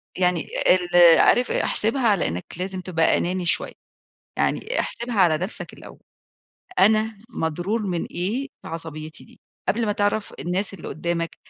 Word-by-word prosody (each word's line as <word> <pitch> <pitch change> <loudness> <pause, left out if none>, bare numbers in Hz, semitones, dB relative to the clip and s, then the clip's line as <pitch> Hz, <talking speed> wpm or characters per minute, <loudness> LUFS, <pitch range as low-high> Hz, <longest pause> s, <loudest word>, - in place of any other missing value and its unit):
يعني 180 -2 0 0.2
ال 175 -2 +6
عارف، 245 0 +4
آآ، - - +1
احسبها 235 +3 +3
على 205 -4 +2
إنّك 85 +2 -4
لازم 185 +1 -4
تبقى 165 -3 +2
أناني 180 +1 -2
شوية، 170 - +1 0.7
يعني - - 0
احسبها 235 0 -4
على 165 -4 +4
نفسك 185 +6 -3
الأول، - - -13 0.8
أنا 215 +1 +3
مضرور 175 +5 -2
من 180 -4 -2
إيه 220 +10 -3 0.2
بعصبيتي 160 -1 -6
دي؟ 240 +1 -20 0.3
قبل 230 +1 +1
ما 210 - 0
تعرف 205 +1 -1
الناس 190 +4 -2
اللي - - -9
قُدامك 170 0 -3
185 Hz, 145 wpm, -23 LUFS, 170-215 Hz, 0.8 s, ال